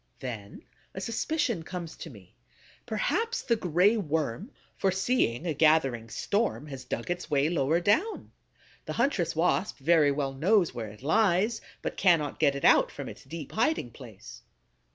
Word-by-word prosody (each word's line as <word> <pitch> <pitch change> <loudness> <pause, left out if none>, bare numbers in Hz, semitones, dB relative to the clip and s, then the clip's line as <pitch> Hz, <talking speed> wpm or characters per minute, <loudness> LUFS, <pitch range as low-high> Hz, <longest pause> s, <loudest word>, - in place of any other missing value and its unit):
Then 110 -6 -7 0.3
a - - -4
suspicion 230 - -1
comes 175 0 -7
to - - -8
me: - - -15 0.5
perhaps 470 -1 -1
the 235 - +2
Gray 185 +3 +3
Worm, 160 - -2 0.3
foreseeing 190 - 0
a 165 - 0
gathering 135 -7 +2
storm, 205 - -1
has 135 -3 -8
dug 120 +7 -4
its 175 0 -4
way 145 0 +2
lower 160 -1 +1
down. 215 - 0 0.5
The - - -4
huntress 215 - 0
Wasp 180 +5 +1
very 150 +1 +4
well 140 -1 -2
knows 180 +6 +2
where 115 -2 -5
it 105 +4 -14
lies, 210 +6 +2 0.2
but - - -4
cannot 165 -6 +2
get 140 -3 +3
it 140 - -2
out - - +6
from - - -7
its - - -11
deep 160 -4 -8
hiding 225 - 0
place. 115 -6 -12
165 Hz, 155 wpm, -28 LUFS, 140-205 Hz, 0.5 s, out